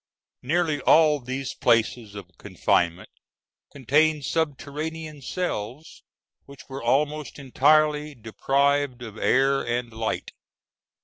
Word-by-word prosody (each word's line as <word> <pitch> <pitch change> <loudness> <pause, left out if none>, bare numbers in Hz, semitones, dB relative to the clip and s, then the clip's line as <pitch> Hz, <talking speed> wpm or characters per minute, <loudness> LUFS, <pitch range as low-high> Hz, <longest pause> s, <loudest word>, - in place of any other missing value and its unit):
Nearly 155 +1 0
all 155 +1 +5
these 130 +1 -5
places 115 -2 0
of 95 -3 -11
confinement 85 +1 -1 0.6
contained 145 +2 +1
subterranean 155 0 -4
cells, 135 - -5 0.5
which 140 -1 -14
were 135 0 -7
almost 145 +5 -1
entirely 150 +2 +2
deprived 135 +3 0
of 110 -2 -9
air 135 +1 +2
and 120 0 -3
light. 110 0 -3
140 Hz, 100 wpm, -24 LUFS, 120-150 Hz, 0.6 s, all